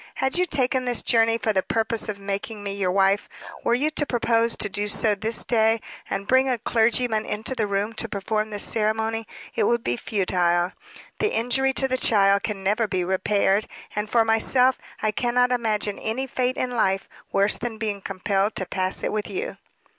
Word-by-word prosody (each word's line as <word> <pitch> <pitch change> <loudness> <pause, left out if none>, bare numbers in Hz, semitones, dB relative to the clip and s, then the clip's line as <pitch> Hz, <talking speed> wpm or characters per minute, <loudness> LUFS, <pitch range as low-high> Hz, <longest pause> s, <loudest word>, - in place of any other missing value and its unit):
Had 265 - 0
you 360 +1 +2
taken 260 -3 +1
this 245 -2 +1
journey 225 -1 +3
for 220 0 0
the 190 - +2
purpose 225 +2 -1
of 200 -1 -4
making 200 +2 -4
me 200 -1 -3
your 195 -2 0
wife, 195 +1 +2 0.3
were 235 - +3
you 295 +5 +1
to 300 - 0
propose 230 -1 +1
to - - 0
do 205 +1 -2
so 210 +1 +3
this 220 +2 0
day, 225 -1 +3 0.3
and 195 0 -3
bring 260 +3 +3
a 250 - +1
clergyman 225 0 +1
into 220 +4 -3
the 225 -5 -1
room 200 +2 -1
to 230 0 -2
perform 215 +2 -2
the 210 - -5
ceremony, 220 +1 -1 0.3
it - - +1
would 235 -1 +1
be 120 - 0
futile. 175 - 0 0.5
The 425 - +1
injury 255 +4 +1
to 265 - 0
the 255 0 0
child 200 -3 +4
can 205 -3 -4
never 215 +3 +1
be 185 -3 -1
repaired; 195 +2 +1 0.3
and, 210 0 -2
for 230 0 +3
myself, 250 +3 +3 0.2
I 215 - +2
cannot 245 +3 +1
imagine 215 -4 0
any 235 +5 -2
fate 255 -1 -1
in 255 - -1
life 195 -5 +1 0.2
worse 200 +1 +3
than 230 -1 -4
being 210 -3 -3
compelled 195 +2 -1
to 190 - -2
pass 185 +1 -2
it - - 0
with 210 -1 -3
you." 450 +6 -4
220 Hz, 195 wpm, -24 LUFS, 200-240 Hz, 0.5 s, child